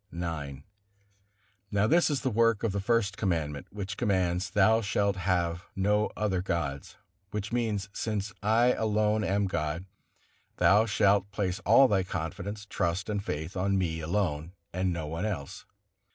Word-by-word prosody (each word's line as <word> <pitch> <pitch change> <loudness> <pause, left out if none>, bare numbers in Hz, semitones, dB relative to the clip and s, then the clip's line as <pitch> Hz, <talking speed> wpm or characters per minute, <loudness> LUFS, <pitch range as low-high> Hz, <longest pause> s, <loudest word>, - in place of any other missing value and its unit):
IX. 75 -5 -5 1.1
Now 100 0 +2
this 165 +8 +4
is 145 -3 0
the 130 - 0
work 115 0 +2
of 115 - +1
the 100 - -2
First 105 -2 +1
Commandment, 80 -7 -2
which 100 -1 -5
commands: 95 -4 0
"Thou 110 +2 +4
shalt 100 -1 +1
have 90 -1 -1
no 105 +2 +2
other 100 -4 0
gods," 75 -7 -3 0.3
which 105 +1 -4
means: 110 -5 -1
"Since 105 -1 -3
I 115 +4 +4
alone 105 0 +1
am 100 +1 +1
God, 80 -1 -2 0.7
thou 105 +3 +5
shalt 100 -1 +3
place 100 -2 -2
all 125 +6 +7
thy 100 -5 +2
confidence, 95 +4 -5
trust 90 0 -2
and 100 -1 -2
faith 80 -3 -4
on 100 +1 +1
Me 85 -4 -1
alone, 85 -1 -1 0.2
and 90 +1 0
on 90 - +1
no 80 -2 -3
one 80 +6 -3
else." 80 -10 -5
100 Hz, 155 wpm, -29 LUFS, 85-105 Hz, 1.1 s, all